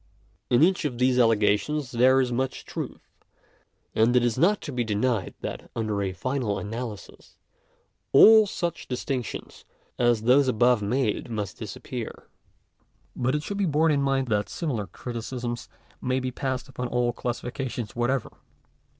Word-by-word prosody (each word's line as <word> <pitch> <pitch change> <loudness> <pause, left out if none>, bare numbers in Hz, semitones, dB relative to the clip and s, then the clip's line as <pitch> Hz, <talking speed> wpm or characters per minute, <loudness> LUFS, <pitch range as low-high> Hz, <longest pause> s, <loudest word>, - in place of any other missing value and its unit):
In 120 +4 +5
each 185 +1 +3
of 135 -5 -2
these 125 0 +3
allegations 115 +5 +2
there 130 +2 +5
is 125 -2 +1
much 130 +2 -2
truth; - - -6 0.9
and 115 +3 +3
it 125 - +5
is 120 -2 +1
not 185 +9 +3
to 150 - -6
be 125 -2 -1
denied 110 -1 -1
that - - -6
under 110 -3 -1
a 95 -1 -1
final 115 +2 -2
analysis, 110 -1 -7 0.7
all 215 +9 +8
such 175 -3 -3
distinc 125 0 -2
tions - - -8 0.4
as 120 -2 +3
those 130 +4 +5
above 120 -1 +3
made 115 +2 -1
must 105 -5 -4
disappear. - - -7 0.9
But 130 +3 0
it 150 - -2
should 200 - -4
be 195 - +2
borne 155 +1 +3
in 145 -2 +2
mind 135 -1 +1
that 105 -1 0
similar 125 - -3
criticisms 120 +3 -5 0.3
may 130 +1 0
be 130 0 -3
passed 130 -1 -3
upon 125 -2 -4
all 120 0 0
classifications 125 -1 -4
whatever. 120 +1 0
125 Hz, 150 wpm, -26 LUFS, 115-135 Hz, 0.9 s, all